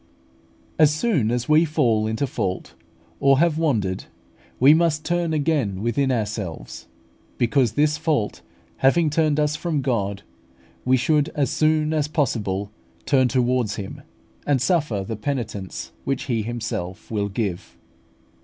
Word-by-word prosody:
As 155 -2 +7
soon 155 - +1
as 120 0 -1
we 155 +2 +5
fall 125 -9 +1
into 110 +5 -2
a - - +1
fault, 100 -7 -3 0.5
or 135 -1 +4
have 160 +1 +2
wandered, 105 - 0 0.5
we 135 +4 +7
must 160 -2 +1
turn 175 -1 0
again 140 - 0
within 130 +4 +1
ourselves; 105 -7 -4 0.5
because 120 -1 +2
this 150 +1 +2
fault 150 -10 -1 0.4
having 155 +4 +3
turned 155 -1 +2
us 150 0 +1
from 155 -2 -1
God, 100 -6 -1 0.6
we 130 +1 +4
should 150 +3 +2
as 140 -4 0
soon 155 0 +2
as 155 -2 +1
possible 105 -9 -1 0.3
turn 130 -3 +3
towards 125 -3 +1
Him, 100 -3 -7 0.5
and 145 -2 +3
suffer 140 - +1
the 110 +3 -4
penitence 110 -5 -4
which 135 -1 -2
He 120 -4 -1
Himself 110 -6 -5
will 105 -2 -1
give. 100 -4 -4
130 Hz, 140 wpm, -23 LUFS, 110-150 Hz, 0.6 s, As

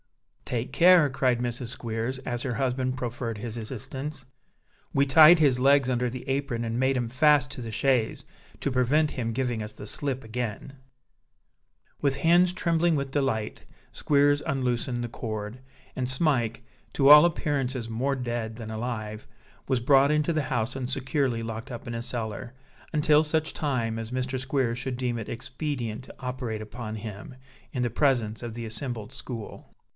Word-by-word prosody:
"Take 125 +1 -3
care," 175 -3 +6
cried 130 -2 +1
Mrs. 120 0 -3
Squeers, 120 +1 -3
as 120 -1 -2
her 125 -3 -2
husband 130 0 -1
proffered 120 -2 -4
his 110 +1 -5
assistance. 130 +5 -5 0.7
"We 140 0 +3
tied 155 +4 +8
his 135 -5 +3
legs 140 -1 +5
under 125 -1 +1
the 125 +1 -8
apron 135 -4 -1
and 115 0 -2
made 130 0 +2
'em 120 -2 -1
fast 140 +2 +3
to 135 - -7
the 115 -1 -6
chaise, 125 -1 +1 0.3
to 140 - -1
prevent 140 +5 +2
him 115 -3 -3
giving 120 -2 -1
us 105 - -6
the 105 -1 -10
slip 135 +1 -2
again." 120 +2 -4 1.3
With 140 -1 +1
hands 175 +4 +4
trembling 170 -2 +1
with 140 -2 -2
delight, 135 -7 -1 0.3
Squeers 145 0 +3
unloosed 125 -2 -1
the 120 - -2
cord; 110 0 -5 0.4
and 125 -1 -2
Smike, 130 -4 0 0.3
to 135 - +3
all 150 +1 +11
appearances 135 -7 0
more 125 +5 -1
dead 120 -3 -3
than 110 -2 -7
alive, 110 -2 -5 0.4
was 130 -2 +2
brought 135 +3 +5
into 150 +2 +2
the 155 -2 0
house 120 -1 -1
and 130 -2 -3
securely 130 -3 -1
locked 115 +2 -6
up 120 -1 -7
in 120 - -4
a 115 - -3
cellar, 120 0 -5 0.4
until 150 0 +4
such 155 0 0
time 120 -7 -1
as 115 +1 -6
Mr. 130 +1 -2
Squeers 130 -2 -1
should 125 0 -3
deem 125 -2 -1
it 110 - -6
expedient 125 -3 -4
to - - -13
operate 125 -4 -4
upon 110 0 -6
him, 110 +3 -8 0.4
in 125 -3 -1
the 120 - +1
presence 120 -5 +1
of 120 -2 -5
the 120 -1 -5
assembled 115 0 -5
school. 115 -6 -8
125 Hz, 170 wpm, -27 LUFS, 115-140 Hz, 1.3 s, all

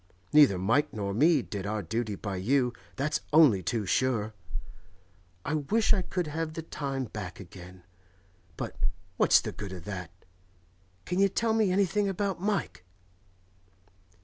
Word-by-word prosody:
Neither 145 -11 +7
Mike 115 +11 +2
nor 100 -2 -3
me 150 - +4
did 100 -1 -5
our 105 0 -2
duty 110 +4 -2
by 100 -1 -4
you, 125 +5 +1 0.2
that's 145 +3 -1
only 145 -11 +6
too 110 +4 -1
sure. 110 0 +1 1.1
I 145 - -1
wish 210 +10 +2
I 195 - +1
could 180 -1 -2
have 155 +1 -3
the 165 - -5
time 135 -4 -3
back 105 -5 -7
again; 90 -1 -12 0.7
but - - -5 0.4
what's - - +6
the - - -4
good 100 -2 -7
of 90 -3 -8
that? 95 -4 -5 1.0
Can 180 +1 -1
you 195 0 +5
tell 225 +3 0
me 220 -4 +2
anything 200 +2 +2
about 195 -1 -2
Mike? 195 - -2
135 Hz, 150 wpm, -29 LUFS, -, 1.1 s, Neither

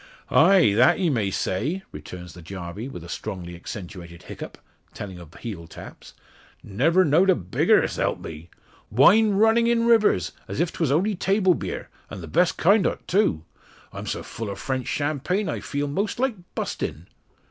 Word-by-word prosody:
"Ah! 195 - +6 0.2
that 125 +5 +5
ye 180 -5 +1
may 110 -7 0
say," 135 - -2
returns 90 -1 -9
the 90 - -12
Jarvey, 90 +5 -7
with 90 -10 -8
a - - -10
strongly 90 -2 -6
accentuated 85 -1 -9
hiccup, - - -9 0.4
telling 95 -4 -7
of 85 -3 -13
heel 95 -8 -7
taps. - - -12 0.5
"Never 160 - +2
knowed 165 +6 +4
a 185 - +6
bigger, 90 -1 +2
s'help - - -1
me. 80 +2 -9 0.4
Wine 200 - +5
runnin' 225 +3 +4
in 235 -1 +2
rivers, 210 - +3 0.2
as 100 - -5
if 170 0 0
'twas 160 -5 0
only 190 +9 +2
table 195 0 +2
beer - - -5 0.2
an' 100 - -7
the 80 - -8
best 170 - +2
kind 195 +3 +4
o't - - -5
too. 175 - +2 0.5
I'm - - -7
so - - -3
full 115 -2 -6
o' 100 - -4
French 130 +1 -3
champagne, 150 +8 -1
I - - -2
feel 145 0 -3
most 200 +11 -2
like 265 -1 +1 0.2
burstin'." 80 +3 -4
135 Hz, 170 wpm, -24 LUFS, -, 0.5 s, Ah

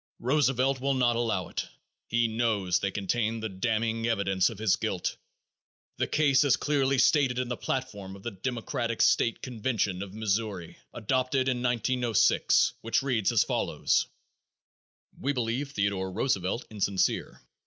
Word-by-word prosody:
Roosevelt 135 0 +1
will 140 0 +1
not 120 -2 +2
allow 115 -6 -1
it; - - -4 0.4
he 120 0 +2
knows 110 -5 0
they 100 - -1
contain 110 +3 -1
the 110 0 -4
damning 115 +3 -1
evidence 95 -4 +1
of 115 - -9
his 110 -2 +2
guilt. - - -2 0.8
The - - 0
case 140 -2 +3
is 140 -3 +4
clearly 140 -2 +1
stated 130 -1 +3
in 125 -1 -2
the 125 - -1
platform 105 -8 -4
of 100 - -14
the 120 - -4
Democratic 115 +2 -3
state 115 - +2
convention 110 -6 -2
of 100 0 -7
Missouri, 105 -4 -2
adopted 130 +3 0
in 125 -2 0
1906, 125 -2 +2
which 115 +4 0
reads 120 -7 +1
as - - +4
follows: - - 0 1.1
"We 140 +2 0
believe 125 +2 -2
Theodore 100 -2 -1
Roosevelt 100 0 -1
insincere. 100 -2 -1
115 Hz, 145 wpm, -28 LUFS, 100-130 Hz, 1.1 s, is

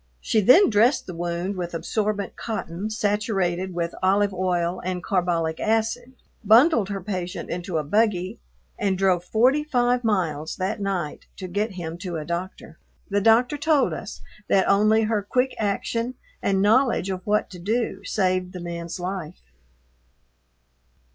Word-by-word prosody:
She 220 - +1
then 255 - +6
dressed 225 +6 +3
the 180 - -7
wound 175 +3 -3
with 175 -2 -4
absorbent 205 +4 -2
cotton 210 -3 -4
saturated 195 -4 -1
with 170 -1 -2
olive 200 +2 +2
oil 180 -1 -1
and 180 -1 -3
carbolic 175 -4 0
acid, 225 +3 -1 0.3
bundled 225 - +5
her 195 -1 -4
patient 185 -1 -5
into 175 -1 -3
a 155 - 0
buggy, 185 +2 0 0.4
and 195 -2 0
drove 185 -2 +2
forty 250 +10 +3
five 245 -4 +1
miles 165 -8 -1
that 195 +3 -3
night 185 -6 -3
to 185 - -6
get 205 +4 -2
him 170 -2 -6
to 180 -2 -5
a 155 - -5
doctor. 170 -1 -6 0.3
The 205 0 +2
doctor 240 +6 +4
told 295 -2 +2
us - - -7 0.3
that 190 - +3
only 215 +2 +4
her 215 -1 0
quick 250 +6 0
action 230 +4 -1 0.3
and 195 0 +1
knowledge 225 -3 +3
of 185 -1 -4
what 210 0 0
to 180 - -9
do 225 +6 -2
saved 185 -2 0
the 180 - -6
man's 170 0 -6
life. 180 -2 -5
195 Hz, 150 wpm, -24 LUFS, 180-220 Hz, 0.4 s, then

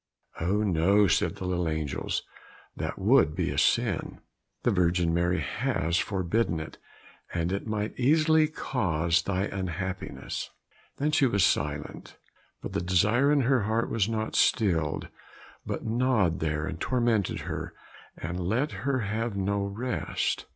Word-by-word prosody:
"Oh 100 +6 +1
no," 100 +2 +4
said 90 - +1
the 95 - -6
little 90 -2 0
angels, 80 -3 -2 0.5
"that - - -4
would 75 - +4
be - - -1
a - - -4
sin. - - +1 0.4
The - - +3
Virgin 85 -2 +2
Mary 85 0 +1
has 80 +3 -1
forbidden 95 -2 0
it, 80 - -8 0.6
and 85 +1 0
it 100 +3 -3
might 105 +1 -3
easily 155 +4 +4
cause 85 - 0
thy 95 +1 -1
unhappiness." 95 -1 -4 0.5
Then 150 +2 0
she 145 -3 +4
was 100 -5 +2
silent, 75 0 -1 0.5
but - - -5
the - - 0
desire 105 - +3
in 145 -1 +4
her 130 -1 +3
heart 110 +2 0
was 110 -2 +1
not 110 -1 -2
stilled, 85 - +2 0.6
but - - -4
gnawed 110 -7 +1
there 75 -1 -1
and 80 - -5
tormented 120 -6 +1
her, - - -5 0.4
and 85 +2 -4
let 110 - 0
her 135 -2 -1
have 110 +1 -2
no 100 +1 0
rest. 115 +6 -2
100 Hz, 145 wpm, -28 LUFS, 85-115 Hz, 0.6 s, no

